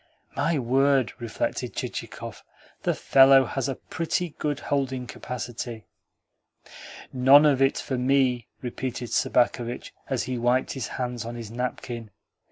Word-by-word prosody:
"My 165 -1 +1
word!" 135 -1 +2
reflected 115 -2 -3
Chichikov. - - -6 0.4
"The - - 0
fellow 135 0 +6
has 135 +2 -2
a 135 - -2
pretty 170 +4 -2
good 145 -2 -1
holding 130 -3 -1
capacity!" 120 -1 -6 1.3
"None 135 +3 +7
of 140 -3 +3
it 135 0 +3
for 130 -2 -3
me," 125 -2 +2 0.2
repeated 125 -1 -4
Sobakevitch 120 0 +1 0.2
as 130 -3 0
he 130 -1 -3
wiped 125 +2 +2
his 130 -6 -4
hands 125 -2 -3
on 120 +1 -6
his 115 -3 -7
napkin. 120 -1 -4
125 Hz, 130 wpm, -26 LUFS, 120-135 Hz, 1.3 s, None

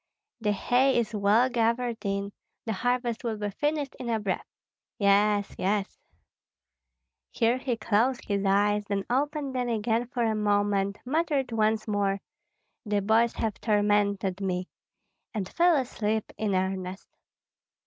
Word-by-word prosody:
"The 210 -2 +1
hay 250 +6 +2
is 230 -2 0
well 210 +4 +4
gathered 235 -1 0
in, 200 0 -2 0.3
the 225 - -1
harvest 245 +2 -1
will 225 -2 -2
be 205 -1 -3
finished 295 +4 -2
in 245 - -4
a 225 -1 +1
breath. 200 -3 -3 0.5
Yes, 205 0 +3
yes 200 +1 -1 0.7
" 60 -1 -59
Here 235 +2 +3
he 255 -3 -2
closed 230 +4 +1
his 200 -1 -1
eyes, 205 +1 +2
then 200 -1 -2
opened 285 +1 0
them 250 -1 -1
again 230 +1 0
for 245 -1 -2
a 225 -1 +2
moment, 205 -1 +1
muttered 285 -2 0
once 220 0 +1
more, 200 -2 0 0.6
"The 205 -2 0
boys 225 +3 +3
have 220 -3 -3
tormented 205 -3 +1
me," 185 -1 -2 0.7
and 200 -4 -2
fell 345 - +3
asleep 220 -5 -1
in 210 -3 -1
earnest. 185 0 -2
215 Hz, 140 wpm, -27 LUFS, 200-240 Hz, 0.7 s, well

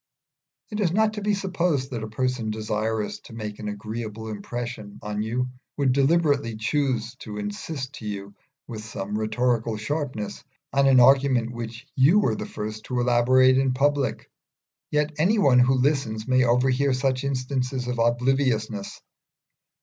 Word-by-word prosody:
It 210 - -3
is 185 -6 +2
not 215 +3 +2
to 210 - -5
be 205 0 +1
supposed 175 -8 -1
that 120 -3 -3
a 110 - -4
person 125 0 -1
desirous 110 0 -2
to - - -14
make 105 -2 -6
an 105 - -5
agreeable 110 +1 -5
impression 110 0 -6
on 105 0 -3
you 120 +4 -1 0.3
would 140 -3 +2
deliberately 140 -3 +2
choose 130 0 0
to 105 -1 -8
insist 125 +7 -5
to 110 -6 -8
you, 100 -1 -5 0.3
with 110 -3 -7
some 105 -1 -5
rhetorical 115 +1 0
sharpness, 130 -2 -4 0.3
on 140 0 +4
an 130 -2 +6
argument 130 -2 +4
which 120 +1 -7
you 145 +9 +5
were 205 - +2
the - - -5
first 110 0 -6
to 125 - -2
elaborate 130 +2 +4
in 135 -1 +2
public; 140 0 0 0.6
yet 150 +1 +1
any 195 +8 +3
one 135 -10 +5
who 130 +2 +4
listens 130 -5 0
may 130 -1 +4
overhear 130 +3 +2
such 130 0 0
instances 130 -1 -2
of 125 -1 -2
obliviousness. 120 -3 0
125 Hz, 155 wpm, -25 LUFS, 110-140 Hz, 0.6 s, an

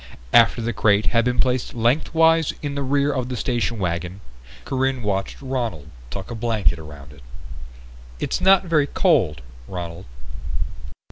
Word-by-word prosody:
After 120 0 +5
the 120 +1 -1
crate 105 0 +3
had 115 -1 +3
been 125 0 0
placed 125 -2 0
lengthwise 160 +6 +3
in 145 -1 -2
the 140 - -3
rear 140 +1 +1
of 130 -2 -2
the 125 - -3
station 120 -1 -1
wagon, 90 0 -3 0.5
Corinne 130 -2 -1
watched 95 -2 -2
Ronald 115 - -3 0.2
tuck 95 - -7
a - - -3
blanket 110 -8 0
around 75 -2 -11
it. 70 - -16 1.0
"It's - - -2
not 190 0 +6
very 155 -4 +2
cold, 115 - +2 0.2
Ronald." 85 0 -6
120 Hz, 145 wpm, -22 LUFS, 95-135 Hz, 1.0 s, not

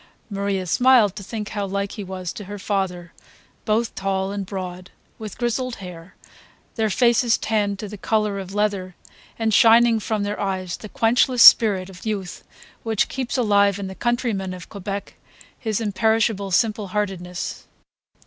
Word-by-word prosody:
Maria 200 -1 -2
smiled 240 0 +4
to 210 - -7
think 210 +1 -6
how 205 -1 -3
like 200 0 -2
he 210 - -6
was 185 -2 -5
to 205 - -8
her 205 +2 -7
father; 190 -4 -3 0.5
both 220 +2 0
tall 195 0 -2
and 200 -2 -4
broad, 185 -2 -6 0.3
with 215 -3 -7
grizzled 245 +1 -1
hair, 180 -2 -11 0.6
their 220 -2 0
faces 235 +1 +3
tanned 205 -2 -1
to 210 - -6
the 205 0 -9
colour 210 -2 0
of 190 -1 -7
leather, 200 -3 -1 0.4
and, 225 -1 0
shining 230 +1 +6
from 215 -1 -2
their 205 +1 -3
eyes, 190 -3 -2
the 215 - -10
quenchless 240 +2 +3
spirit 195 -5 +7
of 185 -1 -13
youth 200 -5 -4 0.4
which 225 -3 0
keeps 260 -1 -3
alive 200 -4 +3
in 200 - -5
the 190 - -6
countryman 220 -5 -1
of 180 - -11
Quebec 200 0 -6 0.4
his 220 -2 -2
imperishable 220 -1 +1
simple 210 +2 +1
heartedness. 185 -3 -4
205 Hz, 160 wpm, -22 LUFS, 190-220 Hz, 0.6 s, spirit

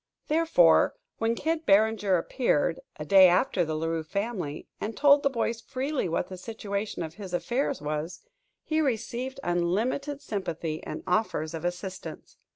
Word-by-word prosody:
Therefore, 305 - +4 0.2
when 225 +1 +1
Kid 320 +5 -1
Barringer 205 -1 +4
appeared, 165 - 0 0.2
a 150 - -6
day 190 +3 +8
after 180 0 +2
the 155 -1 -2
La 155 +1 -2
Rue 165 0 -1
family, 190 -4 -4
and 220 +2 -4
told 285 0 +6
the 280 - +2
boys 230 -2 -2
freely 265 - -2
what 170 +2 -1
the 185 -1 -8
situation 200 -1 -4
of 160 -1 -6
his 190 -2 -5
affairs 255 - -1
was, 150 +3 -3 0.4
he 315 0 0
received 260 0 -2
unlimited 215 +12 0
sympathy 170 - -4
and - - -6
offers 180 -5 0
of 165 0 -5
assistance. 185 +2 -6
200 Hz, 155 wpm, -27 LUFS, 170-245 Hz, 0.4 s, day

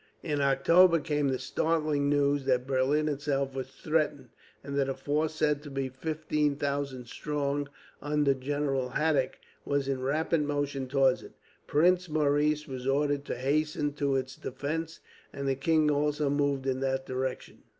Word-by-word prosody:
In 150 -3 -1
October 165 +6 +5
came 145 -1 0
the 130 -1 0
startling 155 -3 0
news 145 -1 +2
that 125 -2 +2
Berlin 135 +3 +1
itself 140 -2 -1
was 130 -1 -4
threatened, 150 +1 -1 0.3
and 140 - -5
that 140 -1 +1
a 135 - -2
force, 155 +2 -1
said 150 -2 +1
to 150 - -9
be 135 -1 -2
fifteen 150 +1 -1
thousand 140 -3 -3
strong, 145 +2 -2 0.3
under 145 -1 +2
General 135 -1 -2
Haddick, 150 -4 +1 0.3
was 140 -1 -1
in 135 -1 -1
rapid 155 +4 +1
motion 145 -2 -2
towards 135 -1 +3
it. - - -13 0.3
Prince 180 +4 +3
Maurice 150 0 +1
was 130 -2 -6
ordered 145 +1 +1
to - - -3
hasten 145 +2 0
to 140 -2 0
its 130 -1 -2
defence, 155 +5 -4 0.3
and 140 0 -4
the 135 - +3
king 155 +3 +2
also 150 0 +1
moved 140 -2 0
in 130 -1 0
that 135 0 -1
direction. 130 0 -4
145 Hz, 160 wpm, -29 LUFS, 135-150 Hz, 0.3 s, October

